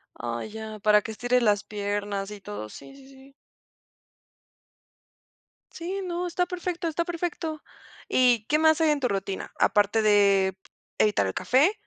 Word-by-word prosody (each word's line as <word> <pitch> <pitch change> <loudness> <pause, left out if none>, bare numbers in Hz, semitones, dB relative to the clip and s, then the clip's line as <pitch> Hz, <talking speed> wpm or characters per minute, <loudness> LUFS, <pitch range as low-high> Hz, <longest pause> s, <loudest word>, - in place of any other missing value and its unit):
Ah, 120 0 -4
ya, 220 0 -7
para 210 0 +4
que 225 - -6
estires 245 +3 +1
las 205 -2 +2
piernas 205 -1 -3
y 205 -1 -9
todo, 105 - -7
sí, 270 - -12
sí, 270 -1 -16
sí. 270 0 -17 2.4
Sí, 370 +4 -5
no, 355 0 -3
está 355 +1 0
perfecto, 355 -1 -3
está 335 +2 -1
perfecto. 335 -2 -4 0.5
¿Y 245 -4 +3
qué 300 - +3
más 315 0 +4
hay 315 -1 +4
en 295 -1 +1
tu 250 - +1
rutina? 195 -1 -4
Aparte 210 +1 +3
de 200 -2 +4 0.4
evitar 205 - +3
el 95 - -3
café, 285 +11 +3
225 Hz, 150 wpm, -26 LUFS, 205-315 Hz, 2.4 s, para